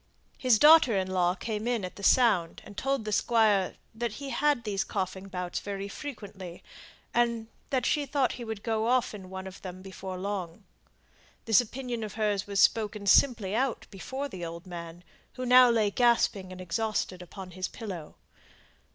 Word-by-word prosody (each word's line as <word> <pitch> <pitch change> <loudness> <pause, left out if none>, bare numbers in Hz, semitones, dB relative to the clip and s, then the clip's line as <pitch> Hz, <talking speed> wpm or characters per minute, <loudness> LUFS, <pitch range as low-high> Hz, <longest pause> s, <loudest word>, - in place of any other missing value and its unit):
His 250 -4 +4
daughter 295 -6 +7
in 190 - +1
law 180 -1 +2
came 220 +1 -4
in 235 -5 0
at 180 - -8
the - - -10
sound, 200 -7 +3
and 205 - -12
told 270 0 -1
the 215 - -3
Squire 210 -4 +2 0.2
that 230 0 -3
he 275 +3 -6
had 290 -4 +1
these 205 -2 -1
coughing 190 -1 -4
bouts 180 -2 -4
very 200 -1 -5
frequently, 200 - -8 0.5
and 235 -2 +1 0.2
that 255 -3 0
she 290 -2 +1
thought 270 -1 +1
he 245 - -7
would 220 -2 -6
go 220 -1 0
off 250 -1 +2
in 190 -3 -9
one 190 0 -6
of 190 0 -10
them 185 0 -8
before 190 -1 -7
long. 190 -1 -4 0.8
This 225 +1 +5
opinion 245 -1 -5
of 210 -3 -6
hers 210 -3 0
was 200 -1 -1
spoken 210 -1 +2
simply 205 -1 +4
out 255 +2 0
before 265 +8 -5
the 185 -10 -8
old 170 +2 -6
man, 170 -1 -8 0.3
who 255 - -5
now 250 0 +8
lay 220 -3 +2
gasping 230 -5 +2
and 185 - -9
exhausted 185 0 -2
upon 185 +1 -9
his 185 +1 -3
pillow. 185 -9 -8
210 Hz, 175 wpm, -29 LUFS, 185-240 Hz, 0.8 s, now